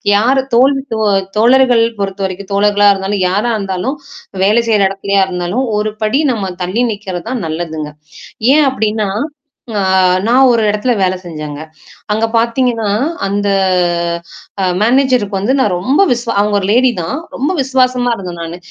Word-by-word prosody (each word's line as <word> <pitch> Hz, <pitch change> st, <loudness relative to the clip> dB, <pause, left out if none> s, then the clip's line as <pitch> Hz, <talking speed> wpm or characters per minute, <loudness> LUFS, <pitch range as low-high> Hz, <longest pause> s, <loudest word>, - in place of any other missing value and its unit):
யார் 255 Hz, +6 st, +3 dB
தோழி 270 Hz, +3 st, +4 dB, 0.2 s
தோ 220 Hz, -, -3 dB, 0.4 s
தோழர்கள் 245 Hz, 0 st, +4 dB, 0.2 s
பொறுத்தவரைக்கும் 195 Hz, 0 st, -4 dB
தோழர்களா 205 Hz, 0 st, +3 dB
இருந்தாலும் 195 Hz, 0 st, -2 dB
யாரா 210 Hz, +6 st, 0 dB
இருந்தாலும், 195 Hz, +7 st, -3 dB, 0.5 s
வேலை 220 Hz, +4 st, +3 dB
செய்ற 210 Hz, -2 st, +3 dB
இடத்துலயா 195 Hz, 0 st, 0 dB
இருந்தாலும், 180 Hz, +8 st, -2 dB
ஒரு 215 Hz, 0 st, -1 dB
படி 265 Hz, +8 st, +1 dB
நம்ம 195 Hz, -4 st, -4 dB
தள்ளி 200 Hz, +8 st, -1 dB
நிக்கிறது 190 Hz, -4 st, -7 dB
தான் 250 Hz, -6 st, -3 dB
நல்லதுங்க. 160 Hz, -1 st, -4 dB, 0.7 s
ஏன் 300 Hz, -1 st, +4 dB
அப்படின்னா, 215 Hz, -4 st, -1 dB, 0.7 s
அ -, -, +1 dB, 0.5 s
நான் 260 Hz, +3 st, +5 dB
ஒரு 230 Hz, -1 st, +1 dB
இடத்துல 210 Hz, +4 st, 0 dB
வேலை 185 Hz, 0 st, +1 dB
செஞ்சேங்க. 155 Hz, -3 st, -7 dB, 0.5 s
அங்க 220 Hz, +2 st, 0 dB
பாத்தீங்கன்னா, 230 Hz, -1 st, 0 dB, 0.4 s
அந்த 205 Hz, +1 st, -1 dB, 1.2 s
அ -, -, +1 dB, 0.2 s
மேனேஜருக்கு 245 Hz, -4 st, +2 dB
வந்து 215 Hz, +7 st, 0 dB
நான் 210 Hz, -7 st, +1 dB
ரொம்ப 265 Hz, -, +2 dB
விஸ் 240 Hz, -1 st, 0 dB, 0.2 s
அவங்க 205 Hz, 0 st, +1 dB
ஒரு 190 Hz, -, -3 dB
லேடி 250 Hz, +2 st, +4 dB
தான். 165 Hz, +6 st, -3 dB, 0.2 s
ரொம்ப 290 Hz, +8 st, -1 dB
விஸ்வாசமா 255 Hz, -2 st, +1 dB
இருந்தேன் 180 Hz, -3 st, -7 dB
நானு, 165 Hz, +1 st, -6 dB
210 Hz, 145 wpm, -14 LUFS, 190-245 Hz, 1.2 s, நான்